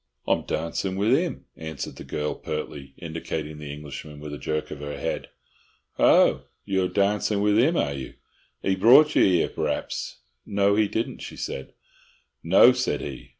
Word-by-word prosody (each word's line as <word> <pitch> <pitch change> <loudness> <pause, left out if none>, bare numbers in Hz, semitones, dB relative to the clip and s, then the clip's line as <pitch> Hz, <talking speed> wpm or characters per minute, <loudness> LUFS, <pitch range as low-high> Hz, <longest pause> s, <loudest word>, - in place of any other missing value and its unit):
"I'm - - +2
darncin' 95 +3 -2
with 105 +5 +3
'im," 170 +3 -2
answered 80 0 -6
the - - -8
girl, 75 0 -3
pertly, 70 -1 -6
indicating 80 -2 -5
the 75 -1 -7
Englishman 75 0 -8
with 75 0 -7
a 75 - -6
jerk 75 +4 -3
of - - -6
her 75 0 -5
head. - - -3 0.7
"Ho, - - +5 0.2
you're 95 -2 +1
darncin' 105 +1 +1
with 105 +1 +3
'im, 160 +8 +3
are 70 - 0
you? 65 -2 -7 0.5
'E 95 - +2
brought 135 +10 +7
you - - +6
'ere, 90 -3 +3
p'r'aps?" - - -3 0.3
"No, 100 0 +2
he 105 0 +3
didn't," 115 +3 -3
she - - -8
said. 65 - -5 0.7
"No," 95 +8 +7
said 125 - -1
he. 65 -3 -7
90 Hz, 165 wpm, -25 LUFS, 75-105 Hz, 0.7 s, brought